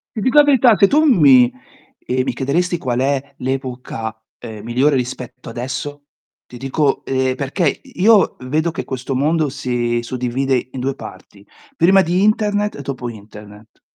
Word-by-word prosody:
Ti 215 - -3
dico 260 +6 +1
la 295 - +9
verità, 255 -5 +5
se 200 - +5
tu 305 +6 +3
mi 140 - +6 0.5
ehm, 130 +1 -1
mi - - -2
chiederesti 170 +6 -1
qual 125 -4 -2
è 140 +1 -1
l'epoca, 125 -4 -5 0.2
ehm, 110 -3 -9
migliore 130 +5 +1
rispetto 125 -1 -5
adesso, 140 +4 -5 0.4
ti 125 - -11
dico 135 +2 -1
ehm, 130 -1 0
perché 140 +4 -1
i 180 - -10
io 215 -1 +5
vedo 155 +6 -1
che - - -5
questo 130 +1 -5
mondo 150 +2 +1
si 120 -3 -2
suddivide 125 +1 -2
in 130 - -7
2 135 +1 -2
parti: 100 -1 -12 0.3
prima 190 +3 +5
di 180 +3 +1
internet 210 0 +1
e - - -7
dopo 125 -3 -5
internet. 105 0 -13
135 Hz, 165 wpm, -18 LUFS, 125-170 Hz, 0.5 s, la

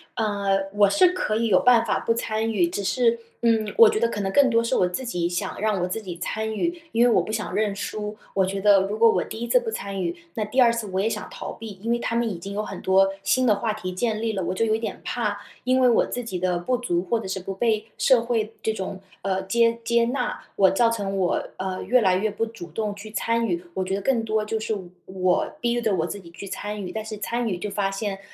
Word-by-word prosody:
呃， 200 -2 0
我 205 -1 +5
是 355 - +5
可 360 -12 -1
以 230 +1 +1
有 185 -4 +5
办 240 -2 +5
法 - - 0
不 230 - +1
参 225 -1 -1
与。 190 -5 +3
只 185 +4 -4
是， 235 +1 +2 0.2
嗯， 225 -2 +2
我 455 -1 +9
觉 430 -1 0
得 - - +3
可 210 -3 -3
能 195 -1 -1
更 280 +4 +5
多 230 -1 +3
是 230 - 0
我 180 - +3
自 180 +9 -4
己， 175 -8 -1
想 175 0 -3
让 210 -2 0
我 180 - 0
自 205 +5 -3
己 180 -4 -7
参 220 +4 -3
与， 340 +8 -2
因 230 +1 +4
为 - - +5
我 - - +4
不 215 - -5
想 215 -1 -3
认 210 -2 0
输。 210 +1 -4 0.2
我 190 -1 +3
觉 195 +1 -3
得 200 -1 +6
如 210 +2 -3
果 230 0 +6
我 - - +1
第 220 - -7
1 235 - -2
次 - - +5
不 480 -2 -4
参 200 - -4
与， 170 -1 -2 0.2
那 215 - -1
第 250 +5 +2
2 235 -2 +6
次 230 -2 -3
我 190 0 -1
也 215 - +1
想 - - -4
逃 - - -6
避。 220 -3 -9
因 230 +2 -2
为 235 - +1
他 230 - -2
们 235 0 +1
已 190 - -4
经 195 +4 -7
有 210 +1 -2
很 - - -7
多 195 +1 +4
新 255 +6 +2
的 215 -4 +4
话 215 +1 -1
题 210 -4 -5
建 215 +3 -1
立 225 0 0
了， 195 - -2
我 180 - -1
就 205 - 0
有 220 0 +2
点 220 -3 -5
怕， 210 -4 -2 0.2
因 255 +1 +3
为 250 - +6
我 235 - +4
自 245 - -4
己 190 -6 -4
的 180 -1 0
不 250 +9 0
足， 175 -8 -1
或 235 - +2
者 210 - -6
是 190 0 -3
不 195 +2 -5
被 215 +1 0
社 255 -3 +4
会 225 -2 -1
这 220 - +1
种 190 -2 -5 0.2
呃， 190 0 -1
接 230 +4 +2
接 235 0 +3
纳， 250 +1 -2
我 190 -2 +5
造 230 +4 +3
成 200 -4 -2
我， 185 -2 0
呃， 185 0 -3
越 250 +6 +4
来 190 -3 +4
越 210 +4 +1
不 215 +2 -1
主 225 -6 -9
动 210 +3 -2
去 210 +1 -10
参 230 +1 0
与。 175 -5 -1
我 190 - -1
觉 185 +1 -3
得 200 - -3
更 235 +2 +1
多 220 -1 0
就 220 +1 -2
是 220 0 -2
我 200 -3 -4 0.2
我 185 -1 +1 0.2
逼 240 0 +1
着 220 -3 +1
我 160 -3 0
自 200 - -5
己 170 - -14
去 190 +4 -9
参 210 +2 -5
与， 185 - -5
但 220 - -3
是 215 0 -6
参 235 +3 -2
与 190 -5 -1
就 210 +4 -4
发 200 0 0
现， 195 -1 -3
215 Hz, 290 characters per minute, -24 LUFS, 195-230 Hz, 0.2 s, 我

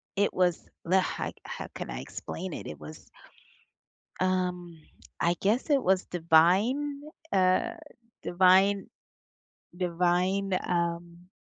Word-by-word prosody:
it 200 +1 +1
was 180 -2 +1 0.2
the 185 +3 +4
how 185 - -2
how - - -6
can - - -6
I - - -5
explain 185 0 -6
it? - - -7
It 75 - -8
was 75 +1 -11 1.1
um, 180 -3 -1 0.4
I 170 +1 +2
guess 220 +9 0
it 280 -2 +4
was 190 0 +2
divine, 190 - +2 0.3
uh, 185 -1 +2 0.5
divine 190 +2 +4 0.9
divine, 180 +2 +1
um 170 0 -2
180 Hz, 110 wpm, -28 LUFS, 170-190 Hz, 1.1 s, the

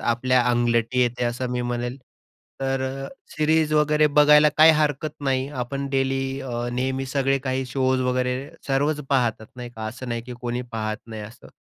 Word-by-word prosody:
आपल्या 125 +2 +2
अंगलट 120 0 +1
येते 125 -1 +1
असं 120 +1 -2
मी 125 0 -1
म्हणेल. 120 +2 -3 0.6
तर 135 0 -1
अ, 135 +1 -4 0.3
सिरीज 155 0 +2
वगैरे 150 0 +4
बघायला 150 +1 +6
काही 160 +1 +8
हरकत 150 0 0
नाही, 135 -1 0
आपण 140 +1 -4
डेली 135 0 0 0.2
अ, 120 -2 -3
नेहमी 130 +2 -2
सगळे 135 0 +1
काही 130 0 -2
शोज 130 0 +1
वगैरे 125 0 0 0.3
सर्वच 145 +2 +1
पाहतात, 120 -5 +1
नाही 120 -1 -7
का. 110 -2 -6
असं 120 +3 -7
नाही, 115 -1 -3
की 125 +1 -9
कोणी 120 0 -3
पाहत 110 -1 -2
नाही 110 -2 -7
असं. 110 +3 -12
130 Hz, 170 wpm, -24 LUFS, 120-140 Hz, 0.6 s, काही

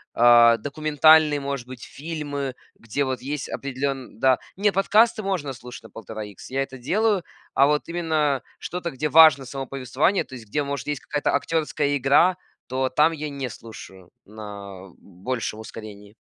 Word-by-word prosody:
а, 120 -1 +7
документальные, 155 +3 +4
может 140 -3 -4
быть, 130 -2 -10
фильмы, 145 -4 -5 0.2
где 115 +5 -3
вот 130 -1 -3
есть 145 +1 -4
определенн 135 -3 -4
да. 130 0 +4 0.2
Не, 205 +1 +2
подкасты 215 +4 +3
можно 180 -8 -2
слушать 125 -1 -11
на 110 - -13
1,5 110 -1 -7
икс, 100 -2 -12
я 135 +1 0
это 135 -1 -10
делаю, 200 - +1 0.3
а 140 - +5
вот 150 0 0
именно 155 -5 0 0.2
что-то, 175 -1 -5
где 135 +3 -2
важно 155 -3 +7
само 135 +1 -6
повествование, 135 +8 0
то - - -16
есть 115 -3 -11
где, 145 +8 -1
может, 140 -1 -4
есть 145 -2 -3
какая-то 145 -1 -1
актерская 150 -1 0
игра, 140 +7 +4 0.3
то 130 +1 -1
там 150 +5 +3
я 155 -2 -5
не 140 -3 -5
слушаю 95 -5 -12 0.2
на 100 -3 -10
большем 105 +4 -5
ускорении. 105 -2 -10
135 Hz, 160 wpm, -24 LUFS, 120-150 Hz, 0.3 s, а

